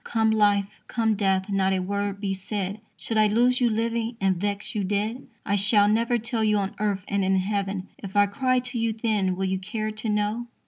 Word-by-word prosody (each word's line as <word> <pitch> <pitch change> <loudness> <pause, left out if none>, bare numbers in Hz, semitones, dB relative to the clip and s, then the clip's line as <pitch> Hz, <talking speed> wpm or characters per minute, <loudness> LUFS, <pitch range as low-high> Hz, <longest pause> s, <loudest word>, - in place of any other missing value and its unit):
Come 220 -1 +1
life, 205 -2 +3 0.2
come 225 -1 +1
death, 195 -2 +1
not 195 -1 +1
a 190 - +1
word 200 +1 -2
be 200 -1 -1
said; 195 +1 -4 0.2
Should 225 - -3
I 215 0 +5
lose 245 +4 +2
you 240 - +4
living, 230 +1 -1
and 195 -1 +2
vex 200 +3 -3
you 210 - -1
dead? 210 +6 -2 0.2
I 200 - +1
shall 205 +1 +4
never 230 +3 +2
tell 225 0 -2
you 210 -1 +3
on 195 -1 -2
earth, 205 -3 -1
and 200 -1 0
in 190 0 +2
heaven, 195 0 -1
If 195 0 -8
I 205 0 +6
cry 255 +5 +1
to 250 -1 -5
you 225 -1 0
then, 210 -5 0
will 190 +1 -2
you 190 0 -1
care 215 +3 -3
to 215 +1 -5
know? 210 +3 -1
205 Hz, 220 wpm, -25 LUFS, 195-225 Hz, 0.2 s, I